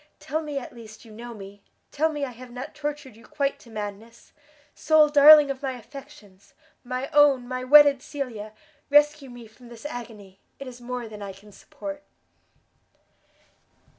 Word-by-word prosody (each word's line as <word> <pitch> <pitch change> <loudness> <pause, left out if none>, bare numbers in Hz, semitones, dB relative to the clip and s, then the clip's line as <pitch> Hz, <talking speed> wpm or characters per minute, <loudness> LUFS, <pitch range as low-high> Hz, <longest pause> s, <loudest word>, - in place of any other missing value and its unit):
tell 310 +3 -3
me 295 -2 -5
at 270 - -7
least 225 -1 -13
you 225 - -15
know 235 +3 -9
me! 200 -2 -12 0.3
tell 315 +2 +1
me 295 -2 -3
I 260 - -7
have 250 +1 -13
not 250 +1 -8
tortured 295 -4 -6
you 230 - -18
quite 280 -1 -3
to 235 - -17
madness! 215 +1 -9 0.4
sole 310 -1 +4
darling 295 0 +8
of 270 0 -7
my 265 -2 -3
affections! 240 -6 -14 0.3
my 255 +1 -4
own, 280 -4 +4
my 255 0 -4
wedded 285 0 +6
Cecilia! 230 -8 -7 0.4
rescue 295 -1 +3
me 245 -1 -11
from 230 +3 -18
this 235 +2 -13
agony! 215 -8 -9 0.2
it 275 - -9
is 250 -1 -11
more 245 -1 -5
than 210 -1 -11
I 200 -1 -7
can 205 +2 -17
support!" 295 +5 -9
255 Hz, 165 wpm, -25 LUFS, 225-290 Hz, 0.4 s, darling